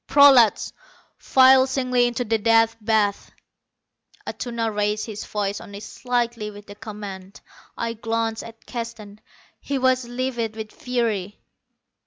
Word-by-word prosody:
"Prolats, 270 -6 +6 0.4
file 260 0 +5
singly 255 -2 +1
into 240 +1 -2
the 225 0 0
Death 225 +1 +3
Bath!" 210 -2 +1 1.0
Atuna 230 -3 -3
raised 210 +1 0
his 215 -2 -6
voice 205 -1 -3
only 200 0 -9
slightly 235 -1 -2
with 205 0 -12
the 205 - -10
command. 200 -2 -9 0.4
I 230 0 -2
glanced 225 0 -2
at 225 0 -13
Keston. 230 -4 -7 0.4
He 280 - -3
was 255 -1 +2
livid 240 -3 -3
with 220 -1 -7
fury. 225 -6 -2
225 Hz, 125 wpm, -23 LUFS, 210-245 Hz, 1.0 s, Prolats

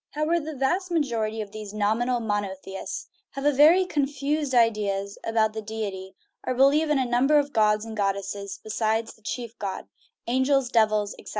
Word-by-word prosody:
However, 305 +3 +1
the 310 -1 -6
vast 350 +8 0
majority 230 -9 -1
of 205 -2 -7
these 210 -1 -8
nominal 230 +4 +1
monotheists 200 -3 -4 0.3
have 275 - -5
very 325 +7 +6
confused 285 -2 -1
ideas 205 -4 +1
about 220 -1 +1
the 220 - -4
deity, 200 -3 -5 0.3
or 255 - -2
believe 285 +4 +4
in 300 - +3
a 260 - +1
number 250 +5 +3
of 285 -1 0
gods 210 0 +3
and 225 -1 -7
god 200 -2 +1
desses 200 0 -6
besides 220 +1 -1
the 220 - -25
chief 235 +1 -6
god 195 -2 -4 0.4
angels, 260 +1 +2
devils, 215 -3 +2
etc. - - -11
225 Hz, 170 wpm, -25 LUFS, 210-275 Hz, 0.4 s, very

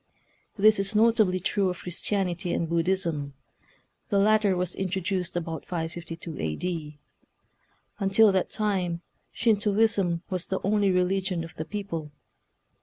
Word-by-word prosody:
This 215 +1 +5
is 195 +2 -1
notably 215 -4 +4
true 195 +1 +1
of 180 - -4
Chris 180 +1 -4
tianity 185 -3 -1
and 170 - -1
Buddhism. 165 -4 -1 0.7
The 200 - +2
latter 210 -1 +4
was 180 0 -1
introduced 185 -1 -2
about 165 -2 -3
552 165 -1 -5
A. 80 -1 -1
D. 160 - -4 1.0
Until 200 +2 +5
that 190 -1 0
time 185 -5 -1 0.3
Shintoism 205 -5 +2
was 185 -1 -3
the 190 - -1
only 205 0 +2
religion 180 -1 +1
of 165 - -9
the 155 - -4
people. 165 -5 -5
185 Hz, 130 wpm, -27 LUFS, 170-200 Hz, 1.0 s, This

